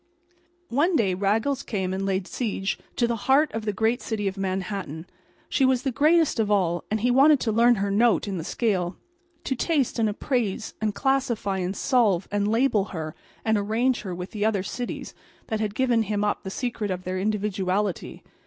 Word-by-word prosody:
One 315 +8 +2
day 200 -9 +2
Raggles 215 +9 0
came 190 -7 -2
and 195 +1 -2
laid 190 -1 0
siege 205 -3 -2 0.2
to 240 - +2
the 235 0 0
heart 290 +3 +5
of 220 0 -4
the 210 - +1
great 225 +4 0
city 210 -3 -2
of 190 - -2
Manhattan. 190 -4 -3 0.4
She - - +1
was 260 -2 +3
the 270 - 0
greatest 305 +2 +3
of 215 -2 +1
all; 175 -4 +1
and 215 0 -1
he 245 +2 +3
wanted 280 +3 +6
to 225 - 0
learn 235 +2 +5
her 200 -1 -1
note 220 +2 +3
in 195 -3 -3
the - - -4
scale; 180 -3 -1 0.5
to - - -1
taste 275 -3 0
and 220 -1 +3
appraise 225 -1 -2
and 215 -2 0
classify 250 -8 0
and 185 +2 -2
solve 215 -9 +2
and 205 0 +1
label 225 -2 +2
her 160 -6 -5 0.3
and 220 -1 +3
arrange 230 +5 +1
her 185 -5 -5
with 180 +1 -6
the 210 -1 -3
other 210 -3 +1
cities 245 +5 -5 0.4
that 220 - -1
had 210 -1 -2
given 245 -3 +2
him 210 -1 -1
up 205 - 0
the 190 - -6
secret 230 -1 -3
of 185 -1 -3
their 185 0 -3
individuality. 200 -2 -1
215 Hz, 195 wpm, -25 LUFS, 195-245 Hz, 0.5 s, wanted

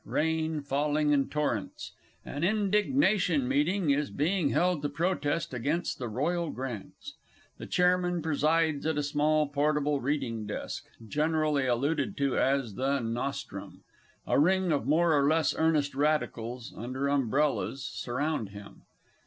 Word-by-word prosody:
Rain 160 -1 -1
falling 150 +2 +1
in 140 -2 +2
torrents. 145 -9 -2 0.3
An 145 +3 -5
Indignation 205 - +2
Meeting 150 +5 +1
is 145 +1 +1
being 165 +1 0
held 180 0 +1
to 145 - -1
protest 160 -2 -1
against 145 +8 -2
the 125 - -3
Royal 165 +9 -1
Grants. 125 -7 -7 0.5
The - - -7
Chairman 180 -1 +2
presides 155 0 +1
at 160 -2 0
a 150 - 0
small 150 +1 +2
portable 145 0 +1
reading 125 -6 -2
desk, 105 - -5 0.2
generally 150 0 +1
alluded 140 +4 0
to 140 -2 +1
as 135 -5 +1
The 135 +5 0
"Nostrum"; 120 +3 -5 0.4
a - - +2
ring 185 +3 +3
of 140 -5 0
more 160 +2 +3
or 140 -1 +3
less 160 0 +2
Earnest 155 -3 +1
Radicals, 130 -5 -1
under 130 +4 -3
umbrellas, 140 0 0
surround 130 -2 -2
him. 100 0 -12
150 Hz, 135 wpm, -29 LUFS, 135-160 Hz, 0.5 s, ring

